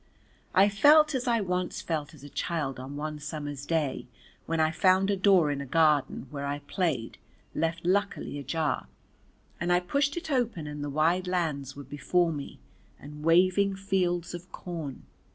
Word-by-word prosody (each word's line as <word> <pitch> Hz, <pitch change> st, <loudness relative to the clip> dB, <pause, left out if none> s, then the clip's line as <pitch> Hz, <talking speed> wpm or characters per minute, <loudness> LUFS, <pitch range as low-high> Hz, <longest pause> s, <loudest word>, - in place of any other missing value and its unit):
I 195 Hz, +2 st, +7 dB
felt 295 Hz, +10 st, +6 dB
as 260 Hz, -1 st, -2 dB
I 230 Hz, -2 st, +2 dB
once 180 Hz, -2 st, -2 dB
felt 155 Hz, -1 st, -3 dB
as 140 Hz, -, -16 dB
a 145 Hz, -, -9 dB
child 145 Hz, -5 st, -2 dB
on 135 Hz, +2 st, -7 dB
one 150 Hz, +1 st, -4 dB
summer's 145 Hz, -2 st, -6 dB
day 155 Hz, -7 st, -1 dB, 0.4 s
when 165 Hz, 0 st, -1 dB
I 155 Hz, 0 st, +3 dB
found 190 Hz, +3 st, +3 dB
a -, -, +2 dB
door 185 Hz, -6 st, +4 dB
in 140 Hz, -1 st, -3 dB
a -, -, -5 dB
garden 150 Hz, -3 st, +2 dB
where 140 Hz, -1 st, -4 dB
I 145 Hz, +1 st, -2 dB
played 145 Hz, -5 st, -2 dB, 0.3 s
left 165 Hz, +1 st, -2 dB
luckily 195 Hz, -5 st, 0 dB
ajar, 150 Hz, 0 st, -1 dB, 0.7 s
and 175 Hz, +1 st, 0 dB
I 175 Hz, -, +5 dB
pushed 280 Hz, -, 0 dB
it 335 Hz, -2 st, -4 dB
open 235 Hz, -, 0 dB
and 150 Hz, 0 st, -5 dB
the 145 Hz, -, -3 dB
wide 165 Hz, +5 st, +1 dB
lands 150 Hz, -7 st, -2 dB
were 140 Hz, -, -8 dB
before 165 Hz, +5 st, 0 dB
me 140 Hz, -2 st, -7 dB, 0.4 s
and 150 Hz, +1 st, -10 dB
waving 185 Hz, +4 st, +4 dB
fields 180 Hz, -3 st, -1 dB
of 175 Hz, +1 st, -8 dB
corn. 160 Hz, -7 st, -6 dB
165 Hz, 170 wpm, -28 LUFS, 145-185 Hz, 0.7 s, I